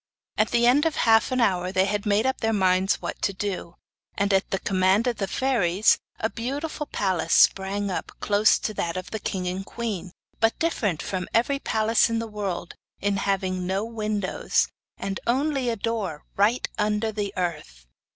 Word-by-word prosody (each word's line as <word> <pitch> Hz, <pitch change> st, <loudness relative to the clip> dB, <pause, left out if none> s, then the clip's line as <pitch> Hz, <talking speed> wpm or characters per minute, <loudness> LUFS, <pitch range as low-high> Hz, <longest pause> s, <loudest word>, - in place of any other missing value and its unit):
At 215 Hz, -, +2 dB
the 235 Hz, 0 st, +3 dB
end 280 Hz, +6 st, +5 dB
of 320 Hz, -, -2 dB
half 225 Hz, +1 st, +4 dB
an 255 Hz, -, +1 dB
hour 185 Hz, -5 st, +1 dB
they 190 Hz, 0 st, +3 dB
had 205 Hz, +1 st, -2 dB
made 210 Hz, +3 st, +2 dB
up 265 Hz, 0 st, 0 dB
their 225 Hz, 0 st, +1 dB
minds 190 Hz, -1 st, +2 dB
what -, -, -5 dB
to 200 Hz, -, 0 dB
do, 185 Hz, -3 st, -4 dB, 0.4 s
and 200 Hz, 0 st, +1 dB
at 190 Hz, 0 st, +2 dB
the 195 Hz, -, 0 dB
command 190 Hz, +3 st, +2 dB
of 245 Hz, -2 st, 0 dB
the 195 Hz, -, -2 dB
fairies, 210 Hz, -5 st, +2 dB, 0.2 s
a 220 Hz, -, +1 dB
beautiful 285 Hz, +7 st, -4 dB
palace 185 Hz, -8 st, 0 dB
sprang 195 Hz, +1 st, +3 dB
up, -, -, -4 dB
close 210 Hz, +1 st, +4 dB
to 215 Hz, -, -3 dB
that 170 Hz, -3 st, -2 dB
of 185 Hz, -, -6 dB
the 220 Hz, -, -3 dB
king 185 Hz, -2 st, -3 dB
and 185 Hz, +2 st, -3 dB
queen, 195 Hz, -5 st, -5 dB, 0.3 s
but 225 Hz, 0 st, +2 dB
different 205 Hz, -, -1 dB
from 185 Hz, -2 st, -3 dB
every 275 Hz, +5 st, +2 dB
palace 220 Hz, -2 st, +2 dB
in 230 Hz, -, 0 dB
the 230 Hz, -, -2 dB
world 205 Hz, -5 st, -4 dB, 0.3 s
in 200 Hz, 0 st, 0 dB
having 185 Hz, -2 st, -1 dB
no 195 Hz, +3 st, -1 dB
windows, 215 Hz, -4 st, -1 dB, 0.3 s
and 195 Hz, -1 st, -4 dB
only 270 Hz, +1 st, +1 dB
a 230 Hz, -, 0 dB
door 205 Hz, -8 st, -3 dB
right 215 Hz, +5 st, +2 dB
under 210 Hz, +1 st, +1 dB
the 205 Hz, -2 st, -3 dB
earth. 150 Hz, -, -4 dB
205 Hz, 185 wpm, -25 LUFS, 190-230 Hz, 0.4 s, end